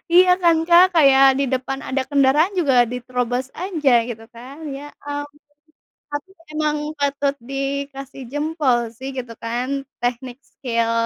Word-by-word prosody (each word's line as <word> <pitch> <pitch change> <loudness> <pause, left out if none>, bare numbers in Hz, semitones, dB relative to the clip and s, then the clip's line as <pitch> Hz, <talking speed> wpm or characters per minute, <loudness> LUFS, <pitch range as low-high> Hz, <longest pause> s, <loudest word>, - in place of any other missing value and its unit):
Iya 365 0 +7
kan, 335 -1 +5
Kak, 345 +1 +8
kayak 275 -4 +6
di 280 - +2
depan 265 +1 -2
ada 265 0 0
kendaraan 290 +7 +3
juga 280 -6 +2 0.2
diterobos 250 0 -2 0.2
aja 320 -8 +1 0.2
gitu 225 -1 -7
kan, 255 +4 -11 0.2
ya 280 +1 -8 0.2
ampun. 290 0 -6 0.7
Tapi 290 +6 -4 0.2
emang 305 -1 0 0.2
patut 285 -1 0
dikasih 275 +1 -5
jempol 295 -4 +1 0.2
sih 265 +2 -6
gitu 245 -2 -5
kan, 240 +2 -2 0.3
teknik 245 +1 -3
skill, 230 -3 -2
275 Hz, 135 wpm, -21 LUFS, 250-290 Hz, 0.7 s, Kak